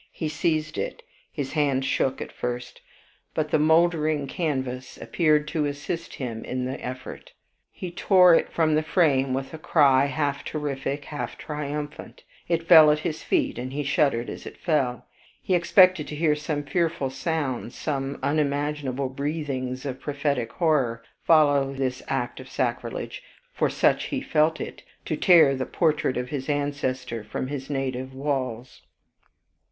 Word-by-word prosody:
He 155 - -3
seized 155 0 -1
it; - - -4 0.3
his 135 -2 -4
hand 140 -3 +1
shook 135 0 0
at - - -11
first, 120 0 -5 0.5
but 155 -1 -1
the - - +3
moldering 155 -2 +3
canvas 130 -4 -3
appeared 155 -3 +2
to 155 -2 0
assist 150 +4 -4
him 115 -4 -5
in 125 0 -3
the 130 +1 -5
effort. 130 +1 -7 0.4
He 180 - -7
tore 180 0 +5
it - - +2
from 160 -2 +2
the 155 - +3
frame 150 -5 +2
with 135 +2 -4
a 160 - -7
cry 140 -4 +4
half 140 0 -1
terrific, 145 -1 -3
half 150 - -5
triumphant, 150 0 -6 0.2
it 165 -1 -1
fell 160 -3 +9
at 150 - +4
his 160 -3 -2
feet, - - 0
and 130 +1 -5
he 145 +2 -2
shuddered 140 -3 +1
as - - -7
it - - -10
fell. 135 -7 0 0.3
He 185 - -2
expected 180 -2 +5
to 150 - -6
hear 155 0 +2
some 150 0 -3
fearful 160 -3 -1
sounds, 135 -5 -3
some 140 -2 -3
unimaginable 145 -2 -1
breathings 135 -2 -3
of 130 -1 -5
prophetic 140 -5 -1
horror, 135 -9 +1 0.2
follow 145 -4 +4
this 130 -1 -2
act - - -2
of - - -10
sacrilege, - - -3 0.3
for - - +1
such - - +2
he 280 - -2
felt 155 - +1
it, - - -6 0.2
to 155 - -1
tear 160 -5 +6
the 130 0 -3
portrait 155 -6 +1
of 125 0 -3
his 135 0 -4
ancestor 135 -5 -2
from 110 +4 -4
his 140 -1 -5
native 130 -2 -3
walls. 130 -4 -3
145 Hz, 155 wpm, -25 LUFS, 130-155 Hz, 0.5 s, fell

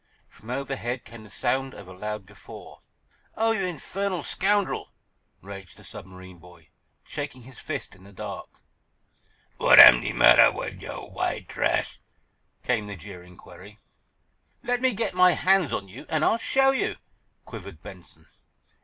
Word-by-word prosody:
From 110 - -16
overhead 130 -2 -4
came 115 -2 -12
the 105 - -15
sound 135 +6 -2
of - - -12
a 95 - -11
loud 105 +2 -6
guffaw. 100 +1 -13 0.6
"Oh, 225 +1 +2
you 205 -4 -1
infernal 180 +1 -3
scoundrel!" 200 +1 0 0.5
raged 95 -2 -11
the - - -16
submarine 95 -1 -12
boy, 85 -2 -18 0.4
shaking 145 -4 -7
his 130 +1 -14
fist 145 -8 -6
in 95 - -20
the 100 - -15
dark. 100 - -9 1.0
"W'at - - +6
am - - +11
de - - -2
matter - - +7
wid - - -7
yo', - - -8
w'ite - - -3
trash?" - - -1 0.6
came 110 -4 -1
the 100 - -7
jeering 90 -2 -12
query. 95 +4 -15 0.9
"Let 245 0 -1
me 260 -1 +2
get 220 -1 -2
my 180 0 +5
hands 190 -4 +2
on 100 - -3
you, 100 +7 -12
and 155 -1 +1
I'll 230 - +2
show 270 +4 +3
you!" 270 - -1 0.5
quivered - - -10
Benson. - - -13
125 Hz, 155 wpm, -25 LUFS, -, 1.0 s, am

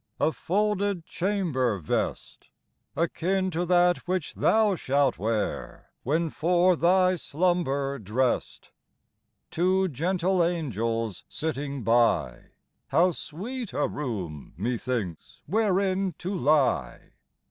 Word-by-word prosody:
A 160 - +3
folded 200 -1 -1
chamber 165 - 0
vest, 80 -5 -3 0.5
Akin 185 +3 0
to 175 +1 -2
that 175 0 +4
which 180 -3 -2
thou 215 -2 +3
shalt 140 -4 +1
wear 110 +1 -3
When 160 +4 0
for 180 +2 +3
thy 185 +2 +3
slumber 140 -5 0
drest; 115 +5 -1 0.8
Two 185 +3 +2
gentle 175 +5 +1
angels 115 - -2
sitting 140 -4 -3
by, 115 - +2 0.2
— - - -50
How 180 +2 +3
sweet 220 - -6
a 145 - +1
room, 95 - -5
methinks, 115 -5 -3
wherein 195 -2 +1
to 185 +3 -4
lie 140 - +1
165 Hz, 105 wpm, -27 LUFS, 125-185 Hz, 0.8 s, that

